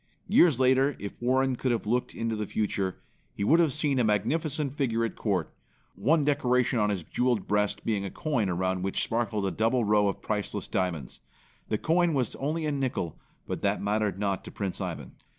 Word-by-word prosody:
Years 155 Hz, -8 st, +5 dB
after, 130 Hz, +2 st, +3 dB
if 100 Hz, +3 st, -8 dB
Warren 130 Hz, +1 st, +2 dB
could 125 Hz, +1 st, -1 dB
have 115 Hz, -, -1 dB
looked 120 Hz, +4 st, -1 dB
into 115 Hz, -1 st, -2 dB
the 105 Hz, -1 st, -3 dB
future, 100 Hz, -3 st, -1 dB, 0.4 s
he -, -, -2 dB
would 160 Hz, +11 st, +5 dB
have 165 Hz, -4 st, +4 dB
seen 145 Hz, -2 st, +1 dB
a -, -, +3 dB
magnificent 140 Hz, -, 0 dB
figure 115 Hz, -5 st, +1 dB
at 115 Hz, -, -5 dB
court, 95 Hz, -7 st, -1 dB, 0.4 s
one 145 Hz, -, +2 dB
decoration 125 Hz, -4 st, +2 dB
on 105 Hz, -1 st, +2 dB
his 95 Hz, -4 st, -2 dB
jeweled 120 Hz, +2 st, 0 dB
breast 105 Hz, 0 st, 0 dB
being 105 Hz, -3 st, 0 dB
a 100 Hz, -, -3 dB
coin 125 Hz, -, -1 dB
around 95 Hz, +1 st, -1 dB
which 95 Hz, +1 st, 0 dB
sparkled 110 Hz, -3 st, -1 dB
a 95 Hz, -, 0 dB
double 115 Hz, +3 st, +1 dB
row 105 Hz, 0 st, +3 dB
of 100 Hz, -, -2 dB
priceless 105 Hz, -2 st, -3 dB
diamonds. 90 Hz, -, -2 dB, 0.5 s
The 110 Hz, -, +1 dB
coin 165 Hz, +4 st, +2 dB
was 125 Hz, -5 st, -1 dB
only, 155 Hz, +4 st, -2 dB
a 150 Hz, -, 0 dB
nickel 130 Hz, -, -2 dB, 0.3 s
but -, -, -4 dB
that -, -, +1 dB
mattered 105 Hz, -2 st, 0 dB
not 100 Hz, -2 st, -1 dB
to -, -, -8 dB
Prince 100 Hz, -3 st, -4 dB
Ivan. -, -, -5 dB
115 Hz, 195 wpm, -28 LUFS, 100-135 Hz, 0.5 s, Years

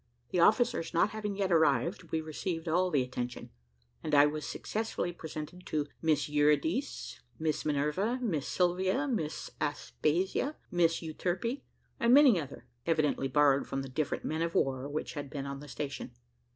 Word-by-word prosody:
The 180 Hz, -, +1 dB
officers 210 Hz, -4 st, +3 dB
not 175 Hz, -, +3 dB
having 210 Hz, -2 st, -3 dB
yet 195 Hz, -2 st, 0 dB
arrived 160 Hz, -, +2 dB
we 160 Hz, -, 0 dB
received 165 Hz, +2 st, -4 dB
all 180 Hz, +3 st, +2 dB
the 145 Hz, -6 st, +2 dB
attention, 125 Hz, -1 st, -5 dB, 0.5 s
and 155 Hz, -2 st, 0 dB
I 145 Hz, 0 st, +8 dB
was 150 Hz, 0 st, -2 dB
successively 220 Hz, -5 st, -3 dB
presented 160 Hz, +2 st, -7 dB
to 150 Hz, -2 st, 0 dB, 0.2 s
Miss 155 Hz, -3 st, +2 dB
Eurydice, 150 Hz, -, +1 dB, 0.2 s
Miss 155 Hz, +1 st, -1 dB
Minerva, 150 Hz, -, 0 dB
Miss 175 Hz, -, -1 dB
Sylvia, 190 Hz, +9 st, +1 dB
Miss 180 Hz, -, -3 dB
Aspasia, 180 Hz, -, 0 dB, 0.2 s
Miss 170 Hz, -2 st, +2 dB
Euterpe, 185 Hz, -, -2 dB, 0.4 s
and 235 Hz, +2 st, +5 dB
many 265 Hz, -, +7 dB
other, 140 Hz, -2 st, -9 dB, 0.2 s
evidently 155 Hz, -4 st, +2 dB
borrowed 140 Hz, 0 st, +3 dB
from 135 Hz, 0 st, -2 dB
the 135 Hz, -, -7 dB
different 145 Hz, +3 st, -2 dB
men 160 Hz, +1 st, -1 dB
of 165 Hz, 0 st, -1 dB
war 135 Hz, 0 st, +1 dB
which 150 Hz, +2 st, -3 dB
had 145 Hz, -2 st, -5 dB
been 140 Hz, -1 st, -5 dB
on 140 Hz, 0 st, -5 dB
the 145 Hz, -, -10 dB
station. 140 Hz, 0 st, -5 dB
160 Hz, 160 wpm, -31 LUFS, 145-185 Hz, 0.5 s, I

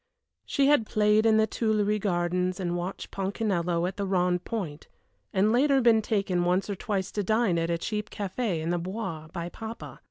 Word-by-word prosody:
She 280 Hz, -, +2 dB
had 280 Hz, -6 st, +4 dB
played 215 Hz, +1 st, +3 dB
in 220 Hz, -1 st, +5 dB
the 220 Hz, -, +4 dB
Tuilleries 215 Hz, -1 st, 0 dB
Gardens 180 Hz, -1 st, 0 dB
and 175 Hz, -2 st, -1 dB
watched 175 Hz, +2 st, -5 dB
Ponchinello 190 Hz, -4 st, -1 dB
at 185 Hz, -, -6 dB
the 200 Hz, -, -1 dB
Rond 180 Hz, -1 st, +1 dB
Point, 170 Hz, -10 st, -5 dB, 0.4 s
and 200 Hz, +3 st, +3 dB
later 270 Hz, +3 st, +4 dB
been 230 Hz, -3 st, +5 dB
taken 195 Hz, -5 st, 0 dB
once 180 Hz, +3 st, +1 dB
or -, -, -2 dB
twice 195 Hz, -1 st, -2 dB
to 205 Hz, -, -2 dB
dine 215 Hz, -4 st, +2 dB
at 165 Hz, 0 st, -1 dB
a 170 Hz, -, +1 dB
cheap 210 Hz, +4 st, -3 dB
café 200 Hz, -3 st, -2 dB
in 165 Hz, +2 st, -1 dB
the 175 Hz, -, 0 dB
Bois 180 Hz, -4 st, -5 dB
by 170 Hz, 0 st, -4 dB
papa. 225 Hz, +4 st, -8 dB
195 Hz, 190 wpm, -27 LUFS, 175-220 Hz, 0.4 s, in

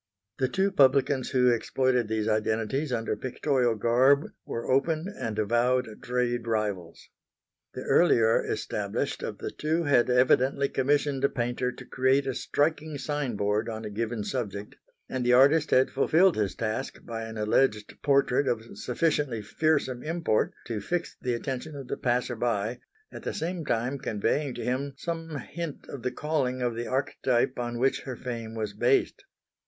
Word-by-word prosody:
The 130 Hz, -, +2 dB
two 190 Hz, +9 st, +1 dB
publicans 135 Hz, -4 st, +3 dB
who 125 Hz, -2 st, +4 dB
exploited 125 Hz, +1 st, +1 dB
these 110 Hz, 0 st, -1 dB
identities 110 Hz, +6 st, 0 dB
under 115 Hz, -2 st, -1 dB
pictorial 130 Hz, -2 st, 0 dB
garb 130 Hz, +6 st, +4 dB, 0.2 s
were 115 Hz, -, -4 dB
open 155 Hz, +5 st, +1 dB
and 110 Hz, -2 st, -4 dB
avowed 120 Hz, +1 st, +1 dB
trade 120 Hz, -1 st, -1 dB
rivals. 105 Hz, -7 st, -2 dB, 0.7 s
The -, -, -5 dB
earlier 115 Hz, -10 st, +4 dB
established -, -, -3 dB
of -, -, -4 dB
the -, -, -5 dB
two 160 Hz, +3 st, -1 dB
had 135 Hz, -5 st, +3 dB
evidently 130 Hz, +2 st, +3 dB
commissioned 140 Hz, 0 st, +1 dB
a 140 Hz, -, +4 dB
painter 125 Hz, 0 st, -1 dB
to -, -, -11 dB
create 130 Hz, +2 st, +2 dB
a 135 Hz, -, -1 dB
striking 155 Hz, +2 st, -1 dB
sign 140 Hz, -3 st, -2 dB
board 105 Hz, +3 st, 0 dB
on 110 Hz, -1 st, -5 dB
a 105 Hz, -, -5 dB
given 115 Hz, +1 st, -2 dB
subject, 105 Hz, -4 st, -4 dB, 0.3 s
and 130 Hz, -1 st, -3 dB
the 125 Hz, 0 st, +3 dB
artist 145 Hz, +5 st, +5 dB
had 130 Hz, +1 st, +4 dB
fulfilled 165 Hz, +6 st, +4 dB
his 105 Hz, -3 st, -1 dB
task 115 Hz, +4 st, -4 dB
by 115 Hz, -1 st, -5 dB
an 110 Hz, 0 st, -7 dB
alleged 105 Hz, 0 st, +1 dB
portrait 140 Hz, -1 st, +3 dB
of 115 Hz, -1 st, -2 dB
sufficiently 130 Hz, -4 st, 0 dB
fearsome 135 Hz, 0 st, 0 dB
import 165 Hz, -7 st, 0 dB
to 115 Hz, -3 st, -3 dB
fix 175 Hz, -, -3 dB
the 125 Hz, -2 st, 0 dB
attention 135 Hz, +5 st, -5 dB
of 135 Hz, -3 st, -7 dB
the -, -, -2 dB
passer 125 Hz, 0 st, 0 dB
by, 115 Hz, -1 st, -1 dB, 0.3 s
at -, -, -8 dB
the -, -, -4 dB
same 170 Hz, +1 st, -3 dB
time 125 Hz, +1 st, -1 dB
conveying 130 Hz, +4 st, -1 dB
to 120 Hz, -, -5 dB
him 135 Hz, +3 st, -1 dB
some 165 Hz, 0 st, -4 dB
hint 165 Hz, +1 st, -6 dB
of 140 Hz, -, -7 dB
the 125 Hz, -, -1 dB
calling 135 Hz, -3 st, -1 dB
of 120 Hz, -1 st, 0 dB
the 120 Hz, 0 st, -4 dB
archetype 130 Hz, -1 st, 0 dB
on 120 Hz, 0 st, -3 dB
which 130 Hz, +3 st, +1 dB
her 130 Hz, -, -6 dB
fame 115 Hz, -2 st, -6 dB
was 110 Hz, -2 st, -3 dB
based. 120 Hz, +6 st, +1 dB
125 Hz, 165 wpm, -27 LUFS, 115-140 Hz, 0.7 s, artist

